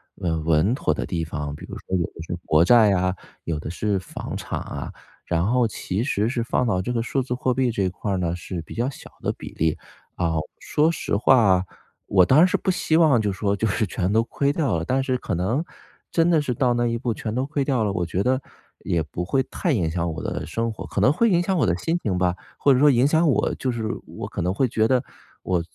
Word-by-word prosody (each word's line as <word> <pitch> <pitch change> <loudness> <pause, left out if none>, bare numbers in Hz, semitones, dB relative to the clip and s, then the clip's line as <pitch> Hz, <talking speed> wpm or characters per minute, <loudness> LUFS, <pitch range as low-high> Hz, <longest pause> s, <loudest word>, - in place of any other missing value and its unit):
稳 80 -3 -2
稳 80 +8 +3
妥 - - 0
的 - - -3
地 85 -3 -2
方， 75 -2 -4
比 - - -10
如 - - -8
说 95 - -4
有 85 - +1
的 - - -12
是 - - -3
国 80 +2 +4
债 115 -2 +6
呀， 90 -1 +1 0.3
有 80 -2 -2
的 75 - -6
是 100 +4 -1
房 95 - -6
产 - - -4
啊， - - -6 0.3
然 85 +1 0
后 125 +1 +3
其 105 0 -2
实 110 -6 0
是 120 -2 -1
放 120 +1 0
到 95 -4 +1
这 125 - -3
个 115 -2 0
数 130 +3 -1
字 125 0 -3
货 125 0 0
币 125 -1 +1
这 100 -3 -1
一 95 - +1
块 100 +3 -4
儿 95 - 0
呢 85 -1 -1
是 90 -1 -6
比 - - -10
较 120 +3 0
小 - - -11
的 - - 0
比 - - -9
例。 80 -1 0 0.4
啊， 85 -1 0 0.3
说 155 +2 +2
实 165 - -3
话， 100 -6 +4 0.4
我 95 -2 +4
当 130 - +5
然 180 - +7
是 - - 0
不 190 - +1
希 160 -2 0
望 155 -7 +5
就 100 -2 -1
是 - - -11
说 100 -2 0
就 110 +2 0
是 110 +3 0
全 90 0 -2
都 115 +1 +4
亏 140 +4 0
掉 140 - 0
了， 80 - -3
但 130 +6 +1
是 130 -1 0
可 100 - -3
能， 100 - 0 0.5
真 165 0 +2
的 160 -3 +4
是 135 -4 -1
到 120 0 +2
那 120 0 +1
一 115 - 0
步 120 -1 -1
全 110 0 -4
都 130 +2 0
亏 145 -1 -1
掉 130 -6 +1
了， 105 - 0
我 90 -3 -1
觉 90 +4 -1
得 130 +1 +1 0.4
也 85 -2 +1
不 80 +4 -5
会 130 +8 +1
太 170 -6 0
影 85 -8 0
响 85 0 -1
我 - - -6
的 - - -3
生 115 0 -2
活， 110 - -8
可 - - -2
能 135 - +5
会 230 +8 +3
影 175 -2 +3
响 190 +1 0
我 145 - +3
的 85 - +2
心 165 - -1
情 95 -4 -1
吧， 90 -1 +2 0.2
或 140 - +4
者 125 - +3
说 150 - +6
影 130 -1 +4
响 160 +3 +3
我， 140 - +2
就 130 -2 -2
是 115 - -4 0.2
我 - - -7
可 - - -4
能 90 +2 0
会 130 +4 +1
觉 110 0 +2
得 130 +1 +2 0.4
我 90 -2 +1
110 Hz, 280 characters per minute, -23 LUFS, 90-130 Hz, 0.5 s, 然